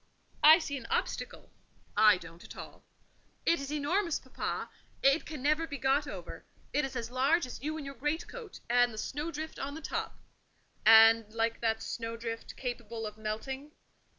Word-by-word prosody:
"I 315 +2 +10
see 290 -5 -3
an 240 - -8
obstacle." - - -2 0.4
"I 210 -2 +7
don't 165 -1 -12
at - - -11
all." - - -10 0.6
"It 335 - +3
is 275 +1 -5
enormous, 315 +4 +1
papa; 260 - -4 0.3
it 275 +4 +4
can 300 -4 -6
never 310 +3 +2
be 285 -3 -5
got 275 +2 +2
over; - - -7 0.3
it 295 - +2
is 270 -1 -4
as 235 -1 -4
large 275 +6 +3
as 250 - -8
you 310 +3 -3
in 300 - -6
your 275 - -6
greatcoat, 320 - -4
and 245 0 +4
the 215 - -9
snowdrift 310 +6 -4
on 285 +1 -4
the - - -6
top." 320 - -4 0.7
"And, 225 -1 +8
like 230 0 0
that 220 -1 0
snowdrift, 230 0 -5
capable 235 -3 -4
of 210 -1 -6
melting?" 265 +7 -4
265 Hz, 170 wpm, -31 LUFS, 230-300 Hz, 0.7 s, I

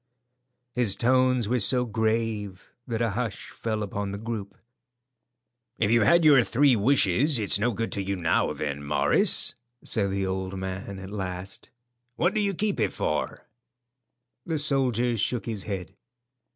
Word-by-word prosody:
His 120 -6 +1
tones 130 0 +2
were 125 +3 +1
so 125 +4 +3
grave 110 -4 -2 0.2
that 115 -1 -1
a 115 - 0
hush 115 0 -4
fell 110 -2 -3
upon 100 0 -4
the 100 - -5
group. 110 -2 -6 1.2
"If 110 -1 +1
you've 115 -3 +4
had 170 +3 +5
your 140 -5 +7
three 135 +2 +3
wishes, 125 - +3
it's 105 -2 +3
no 120 +4 +1
good 115 +1 -3
to 100 - -1
you 100 +1 -2
now, 85 -3 +1
then, 70 -1 -4
Morris," 70 +1 +2 0.3
said 100 -3 0
the 95 0 -1
old 95 0 -3
man 95 +1 -5
at 95 +1 -9
last. 95 -1 -6 0.5
"What 175 +8 +1
do 215 - 0
you 200 -2 0
keep 210 +2 -1
it - - +1
for?" - - -3 1.0
The 165 -2 -2
soldier 130 -5 +2
shook 120 +4 -1
his 110 -5 -4
head. 95 -2 -5
110 Hz, 155 wpm, -26 LUFS, 95-125 Hz, 1.2 s, your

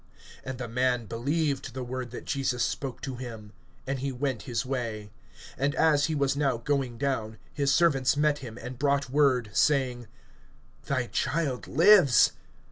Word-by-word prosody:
And 130 -1 -5
the 125 -1 -5
man 125 0 0
believed 135 +3 -2
the 130 - -4
word 125 0 -5
that 120 - -8
Jesus 130 -3 -1
spoke 135 -3 -3
to 130 -2 -5
him, 110 -4 -8 0.3
and 135 0 -2
he 135 +1 -2
went 130 -2 -2
his 120 +2 -1
way. 115 -5 -4 0.5
(51)And 140 +1 0
as 150 -3 +3
he 160 - -1
was 140 -2 +1
now 140 -4 +1
going 130 -1 -1
down, 115 -5 -2 0.2
his 140 -1 +1
servants 140 -4 +3
met 150 -1 +2
him, 120 -4 -9
and 125 +1 -8
brought 140 -2 +1
word 130 -6 +2
saying: 125 -5 +1 0.8
Thy 130 -3 0
child 145 0 -2
lives. 170 - +6
130 Hz, 160 wpm, -28 LUFS, 120-140 Hz, 0.8 s, lives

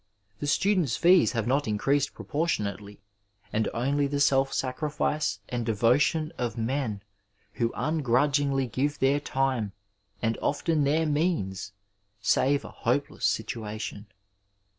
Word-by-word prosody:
The 145 - -3
students' 180 - +2
fees 175 -3 +5
have 115 -3 -1
not 135 +3 +1
increased 135 +7 +1
proportionately, 105 - -3 0.5
and 110 0 +1
only 140 +4 0
the 145 0 -2
self 135 -1 +3
saorifioe 150 0 -1
and 120 -1 -2
devotion 125 +8 +2
of 120 -2 -2
men 115 -3 -2 0.5
who 115 -1 0
ungrudg 145 -1 +1
ingly 135 -1 +1
give 145 +5 0
their 135 +2 +2
time, 130 -7 -1 0.5
and 115 0 -1
often 150 +1 +1
their 155 +3 +2
means, 145 - -1 0.5
save 140 +2 +2
a - - -7
hope - - -1
less - - -4
situation. 105 -1 -4
135 Hz, 125 wpm, -27 LUFS, 115-145 Hz, 0.5 s, fees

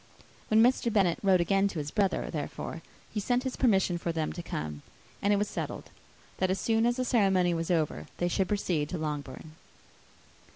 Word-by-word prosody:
When 220 +1 +5
Mr. 245 -1 +3
Bennet 190 -5 +2
wrote 190 -3 +4
again 195 +3 +2
to 190 - -6
his 150 -1 -3
brother, 195 -2 0
therefore, - - -5 0.3
he 210 - -2
sent 245 +4 0
his 260 -2 -3
permission 190 -8 +2
for 170 - -2
them 160 -2 -2
to 175 - -6
come; 75 - -5 0.4
and 200 - +2
it - - +5
was 205 +1 0
settled, - - -5 0.5
that, 185 - +2
as 190 +1 0
soon 225 +3 +2
as 240 - +1
the 255 0 -1
ceremony 190 -7 +3
was 165 +1 -2
over, 160 -4 0
they 175 - 0
should 185 +2 0
proceed 175 -7 -1
to 180 - -3
Longbourn. 150 -1 -5
190 Hz, 195 wpm, -29 LUFS, 165-210 Hz, 0.5 s, When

